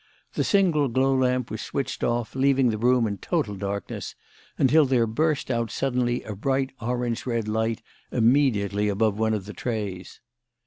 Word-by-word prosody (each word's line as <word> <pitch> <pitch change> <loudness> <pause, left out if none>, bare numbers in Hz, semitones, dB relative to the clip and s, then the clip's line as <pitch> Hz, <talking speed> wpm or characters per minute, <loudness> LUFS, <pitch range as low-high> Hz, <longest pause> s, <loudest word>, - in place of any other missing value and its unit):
The - - 0
single 175 -8 +3
glow 130 +2 +2
lamp 125 -1 +1
was 110 - -4
switched 140 - -4
off, 120 -1 -1
leaving 135 -2 +3
the 110 - -3
room 125 0 +3
in 100 -3 -3
total 155 - -1
darkness, 100 +1 -5 0.4
until 150 +4 +5
there 125 -3 +3
burst 145 +5 0
out 115 -2 -1
suddenly 125 -1 -1
a 105 - -6
bright 135 +5 0
orange 120 +1 -2
red 115 -3 -1
light 110 +1 -1 0.3
immediately 110 -5 +2
above 105 +1 +1
one 110 0 +2
of 100 -3 -5
the 105 - -8
trays. 100 -6 -5
120 Hz, 165 wpm, -25 LUFS, 110-130 Hz, 0.4 s, until